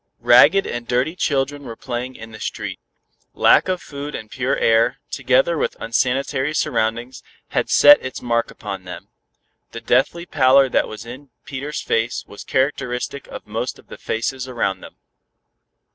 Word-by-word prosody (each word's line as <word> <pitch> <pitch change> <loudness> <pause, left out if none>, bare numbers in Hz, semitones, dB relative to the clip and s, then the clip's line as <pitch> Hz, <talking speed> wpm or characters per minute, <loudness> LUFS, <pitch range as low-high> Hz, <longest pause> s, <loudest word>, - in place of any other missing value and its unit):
Ragged 195 0 +6
and 120 0 -5
dirty 125 +7 0
children 145 -3 -1
were 115 -4 -8
playing 125 +2 -5
in 115 0 -10
the 110 - -11
street. - - -5 0.6
Lack - - +5
of 185 -1 -2
food 145 +1 -7
and 110 -1 -8
pure 130 +2 -1
air, 115 +3 +3
together 135 +5 +2
with - - -2
unsanitary 130 +5 0
surroundings, 120 -3 -1 0.3
had - - -1
set 290 0 +7
its 130 - -5
mark 115 -1 0
upon 95 -3 -7
them. 90 - -9 0.6
The 115 - -5
deathly 155 +7 +1
pallor 135 -4 +4
that - - +1
was 110 +1 -9
in 130 +4 -10 0.2
Peter's 140 +1 -5
face 115 +2 -1
was 100 - -11
characteristic 130 0 -2
of - - -9
most - - -4
of - - -20
the - - -9
faces 130 +3 -3
around 115 -6 -2
them. - - -12
130 Hz, 160 wpm, -21 LUFS, 115-140 Hz, 0.6 s, set